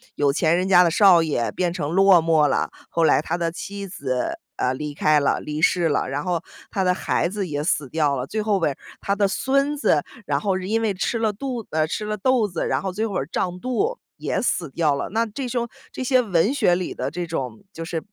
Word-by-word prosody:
有 145 -1 +2
钱 165 +1 +2
人 185 +1 0
家 180 -1 +7
的 170 - +2
少 180 -3 +6
爷， 130 -7 -1
变 175 -2 -1
成 155 -5 -3
落 190 -2 +6
寞 160 -3 +4
了， - - 0 0.2
后 165 - 0
来 - - +5
他 170 - -2
的 170 -1 -1
妻 200 +2 -6
子， 140 - -3 0.2
啊， 125 - +1
离 150 +2 -5
开 150 +1 +3
了 140 - +1
离 150 +1 -5
世 175 -3 +3
了。 145 - 0
然 145 +2 -2
后 175 -2 -1 0.3
他 195 - 0
的 180 0 +3
孩 175 - 0
子 200 -2 -3
也 145 -1 -3
死 145 -5 0
掉 150 -3 +1
了， 125 +2 -4
最 215 - -3
后 210 -2 +1
边 155 -4 +1
儿， - - -24 0.2
他 200 - 0
的 200 -1 +2
孙 275 +8 +1
子， - - +2 0.2
然 - - +1
后 195 -3 0
是 185 0 -5
因 225 +2 +1
为 215 -3 +1
吃 210 +5 -1
了 220 -2 +1
肚 245 0 -5
呃， 155 0 +1
吃 210 +6 -3
了 210 0 -2
豆 245 0 +2
子， 180 - -3
然 - - 0
后 190 - -2
最 220 +3 -1
后 200 - -6
会 - - +1
儿 135 - -6
胀 180 0 -2
肚， 405 - -1 0.2
也 - - -2
死 170 - -1
掉 150 -2 +1
了。 - - -3
那 230 +2 +1
这 250 +4 -5
凶 240 -1 -1 0.2
这 260 - -5
些 255 0 +3
文 200 +3 +1
学 210 -11 +3
里 180 0 -3
的 - - -2
这 175 -1 -3
种 130 -8 -4
就 165 - -6
是 165 -1 -3
180 Hz, 270 characters per minute, -23 LUFS, 155-215 Hz, 0.3 s, 家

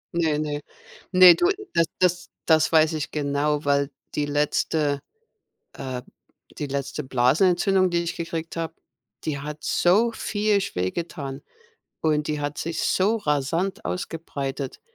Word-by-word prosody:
Ne, 160 -3 +2
ne. 150 -1 -2 0.5
Ne, 185 -1 +9
du, 350 - +2 0.2
das 165 - +4
das 180 -1 +1 0.2
das 160 -1 +4
weiß 160 0 +4
ich 155 -2 -3
genau, 145 0 0
weil 140 0 +2 0.3
die 145 -1 0
letzte, 145 0 +1 0.7
äh, 130 -2 -5
B - - -25 0.5
die 145 - -3
letzte 140 +2 -3
Blasenentzündung, 180 +9 +3
die 175 - 0
ich 170 - -3
gekriegt 165 -1 -5
habe, 165 -1 -3 0.5
die 150 -3 -2
hat 150 +2 -7
so 210 +7 +3
viehisch 205 -2 0
weh 90 +1 0
getan 145 -5 -5 0.6
und 150 -1 +1
die 150 -1 -1
hat 145 +1 -3
sich 165 0 -3
so 205 +5 +2
rasant 165 +1 -1
ausgebreitet 140 -6 -4
155 Hz, 140 wpm, -24 LUFS, 145-175 Hz, 0.7 s, Ne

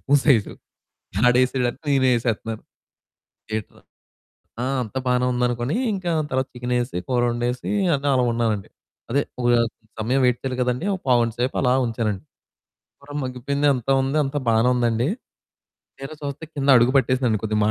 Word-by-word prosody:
Spoon 145 +1 +3
size 115 -9 +4 0.8
ఆడేసాడాని 125 +3 +1 0.2
నేను - - +4
ఎసేతన్నాను. 115 -1 -3 0.9
ఏంట్రా 110 - -7 0.8
ఆ! - - 0 0.2
అంతా 120 +3 -4
బానే 125 0 +2
ఉందనుకోని 120 - 0 0.2
ఇంకా 185 -3 -2 0.2
తర్వాత 130 0 0
చికెనేసి, 125 -3 -2
కూరొండేసి 120 +1 0 0.2
అన్ని 140 +1 -3
అలా 130 -1 +3
ఉన్నానండి. 115 -4 -1 0.4
అదే 140 +4 +2 0.2
ఒక 120 - +2 0.5
సమయం 125 +5 +1
వెయిట్ 125 -1 +2
చేయాలి 130 -2 -3
కదండీ! 125 +7 -1
ఒక 190 - -5
పావుగంట 120 -2 +3
సేపు 125 +2 0
అలా 125 -1 +3
ఉంచానండి. 110 -4 -2 0.8
కూర 145 +1 -12
మగ్గిపోయింది 140 +3 -1
అంతా 130 +1 -1
ఉంది, 135 +3 0
అంతా 140 +2 -2
బానే 115 +2 +3
ఉందండి. 120 +1 +1 0.9
తీరా 135 +3 -7
చూస్తే 140 +2 -5
కింద 140 -1 -1
అడుగు 120 +2 +4
పట్టేసింది 130 -4 +1
కొద్దిగ 105 -1 0
125 Hz, 140 wpm, -23 LUFS, 120-135 Hz, 0.9 s, size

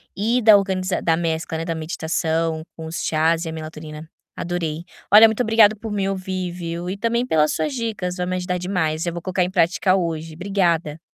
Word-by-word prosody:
e 230 +5 +1
da 215 -2 +8
organiza 190 -2 0
da 165 -1 +2
mescla, 165 -1 -2
né, 165 - -4
da 165 - -2
meditação 160 0 -2 0.2
com 160 - -7
os 160 +1 -4
chás 160 +1 +1
e 165 - -4
a - - -4
melatonina, 155 0 -8 0.3
adorei. 170 -2 -3 0.3
Olha, 215 +2 +10
muito 220 +2 -1
obrigada 220 -2 +5
por 215 +1 -7
me 200 -2 -1
ouvir, 185 -2 -3
viu, 170 0 -5
e 190 - -3
também 235 +3 0
pelas 155 -9 +2
suas 300 - -1
dicas. 220 -7 -3
Vai 180 - -1
me 185 - -1
ajudar 180 0 -2
demais. 175 -3 -1
Eu 170 - -2
vou 175 - -5
colocar 185 +1 0
em 180 - -1
prática 185 +1 +2
hoje. 165 -3 -3
Obrigada. 170 -4 0
175 Hz, 205 wpm, -22 LUFS, 160-195 Hz, 0.3 s, Olha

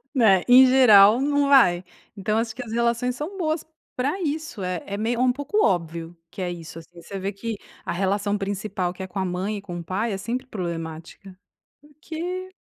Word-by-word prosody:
Né, 200 -7 +5
em 255 +1 +9
geral 235 -3 +7
não 285 0 +2
vai, 185 -11 +5 0.3
então 215 +3 -1
acho 225 -1 -2
que 250 - -5
as 225 - -10
relações 235 +1 0
são 330 +8 -6
boas 315 -2 -1 0.3
pra 280 +9 -1
isso 310 - -3
é 180 -1 -3
é 200 - -5
meio 225 +3 -1
é - - +3
um 255 - +4
pouco 290 +11 0
óbvio 170 -1 -2
que 190 - -8
é 180 -1 -2
isso 165 -1 -8
assim 170 +1 -15
você 195 - -7
vê 195 +2 -2
que 220 +2 -5 0.3
a - - -2
relação 200 +2 0
principal 195 -2 -3
que 190 - -10
é - - -6
com 195 - -6
a 190 - 0
mãe 185 +4 -2
e - - -7
com 175 -3 -7
o - - -7
pai 205 +7 -2
é - - -2
sempre 240 +6 -4
problemática 170 -1 -7 0.4
porque 340 +5 -7
210 Hz, 210 wpm, -24 LUFS, 185-260 Hz, 0.4 s, em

